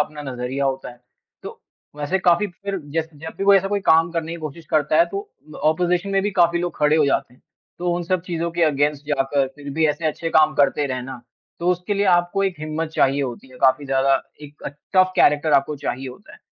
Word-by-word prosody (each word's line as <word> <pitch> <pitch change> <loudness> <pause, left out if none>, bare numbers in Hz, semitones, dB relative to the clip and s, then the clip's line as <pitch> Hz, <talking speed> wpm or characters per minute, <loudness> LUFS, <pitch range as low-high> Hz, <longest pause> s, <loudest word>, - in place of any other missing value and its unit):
अपना 150 0 -3
नज़रिया 125 +2 -3
होता 135 -1 -2
है। 120 0 -17 0.4
तो - - -9 0.4
वैसे 150 +6 -1
काफ़ी 180 +3 +3
फ़िर 195 +2 -6 0.2
जै 165 - +2
जब 160 +2 -9
भी 195 - -1
कोई 200 0 +7
ऐसा 195 0 +1
कोई 205 0 -1
काम 165 +1 +5
करने 165 -1 -3
की 170 - -6
कोशिश 155 +1 -8
करता 150 -2 +2
है। 335 - +5
तो 400 +1 -6 0.4
ओपोज़िशन 180 +3 0
में 195 0 +2
भी 205 - 0
काफ़ी 170 0 +4
लोग 175 0 -3
खड़े 150 +1 +3
हो 155 - +4
जाते 125 -2 -1
हैं। - - -26 0.4
तो 175 0 -1
उन 175 - -2
सब 185 +1 0
चीज़ों 170 -2 -3
के 170 0 -1
अगेंस्ट 145 -1 0
जाकर 140 -1 +1
फ़िर 145 -1 -8
भी 160 -1 +3
ऐसे 150 +2 -2
अच्छे 155 +2 -2
काम 155 -1 +4
करते 145 0 +2
रहना। 130 -1 -5 0.4
तो 175 +1 +2
उसके 180 +3 -1
लिए 200 0 +1
आपको 175 +1 +2
एक 190 -2 -1
हिम्मत 155 +1 -3
चाहिए 140 +1 +2
होती 130 0 -6
है 130 - -15
काफ़ी 130 +2 +3
ज़्यादा 135 0 +2 0.2
एक 145 0 -13 0.3
टफ 185 0 +4
कैरेक्टर 150 +1 +3
आपको 145 +2 +2
चाहिए 135 -2 -4
होता 125 - -13
है। - - -14
155 Hz, 225 wpm, -21 LUFS, 140-175 Hz, 0.4 s, कोई